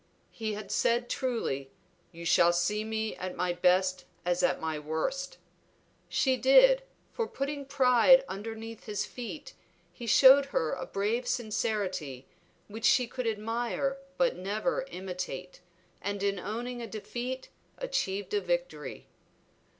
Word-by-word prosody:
He 220 Hz, -2 st, -3 dB
had 205 Hz, -1 st, -7 dB
said 240 Hz, +3 st, +1 dB
truly, 225 Hz, -, -2 dB, 0.4 s
"You 170 Hz, -1 st, -9 dB
shall 170 Hz, 0 st, +5 dB
see 210 Hz, +5 st, 0 dB
me 220 Hz, 0 st, -2 dB
at 185 Hz, 0 st, -5 dB
my 180 Hz, -1 st, 0 dB
best 185 Hz, +1 st, +2 dB, 0.2 s
as 175 Hz, 0 st, +1 dB
at -, -, +2 dB, 0.2 s
worst." 265 Hz, -, -2 dB, 0.7 s
She 260 Hz, -2 st, +2 dB
did, -, -, +6 dB, 0.3 s
for 460 Hz, -2 st, -2 dB
putting 280 Hz, +1 st, -4 dB
pride 260 Hz, 0 st, +6 dB
underneath 225 Hz, +3 st, -7 dB
his 210 Hz, -1 st, -2 dB
feet 255 Hz, +4 st, -8 dB, 0.4 s
he 240 Hz, -, -8 dB
showed 270 Hz, +4 st, +8 dB
her 165 Hz, -, -1 dB
a -, -, -5 dB
brave 220 Hz, +5 st, -1 dB
sincerity, 190 Hz, -, -2 dB, 0.4 s
which 220 Hz, +2 st, -5 dB
she 255 Hz, -2 st, +5 dB
could 250 Hz, 0 st, -4 dB
admire 230 Hz, +4 st, -1 dB, 0.2 s
but 260 Hz, -1 st, +2 dB
never 215 Hz, +8 st, -2 dB
imitate, 180 Hz, -2 st, -6 dB, 0.4 s
and 200 Hz, 0 st, -3 dB
in 200 Hz, -1 st, 0 dB
owning 240 Hz, +5 st, -4 dB
a 230 Hz, -, -5 dB
defeat 245 Hz, +4 st, -5 dB, 0.3 s
achieved 205 Hz, -, -2 dB
a 415 Hz, -, +2 dB
victory. -, -, -3 dB
220 Hz, 130 wpm, -30 LUFS, 190-260 Hz, 0.7 s, showed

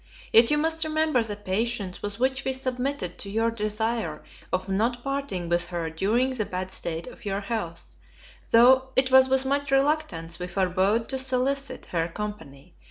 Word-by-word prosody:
Yet 230 Hz, +1 st, +7 dB
you 295 Hz, -, +3 dB
must 320 Hz, +1 st, +1 dB
remember 310 Hz, -4 st, +1 dB
the 220 Hz, -2 st, -3 dB
patience 205 Hz, -1 st, -2 dB
with 205 Hz, +1 st, -5 dB
which 265 Hz, +2 st, +1 dB
we 265 Hz, -, 0 dB
submitted 255 Hz, -7 st, -3 dB
to 200 Hz, -, -3 dB
your 225 Hz, +3 st, +1 dB
desire 215 Hz, -6 st, -2 dB, 0.3 s
of 185 Hz, +1 st, -1 dB
not 230 Hz, +5 st, 0 dB
parting 275 Hz, -11 st, -3 dB
with 175 Hz, +1 st, +1 dB
her 170 Hz, -2 st, -3 dB
during 220 Hz, +10 st, +1 dB
the 250 Hz, -4 st, -1 dB
bad 185 Hz, -1 st, -5 dB
state 165 Hz, -2 st, -2 dB
of -, -, -12 dB
your 200 Hz, 0 st, -2 dB
health, 195 Hz, -6 st, -5 dB, 0.5 s
tho' 260 Hz, +3 st, +6 dB
it 260 Hz, 0 st, +3 dB
was 260 Hz, 0 st, +7 dB
with 265 Hz, 0 st, +2 dB
much 280 Hz, +1 st, 0 dB
reluctance 270 Hz, -, 0 dB
we 180 Hz, -, -4 dB
forbore 190 Hz, +5 st, +1 dB
to 265 Hz, -1 st, -2 dB
solicit 265 Hz, +1 st, 0 dB
her 165 Hz, -1 st, +1 dB
company. 175 Hz, -8 st, -8 dB
225 Hz, 170 wpm, -26 LUFS, 185-265 Hz, 0.5 s, Yet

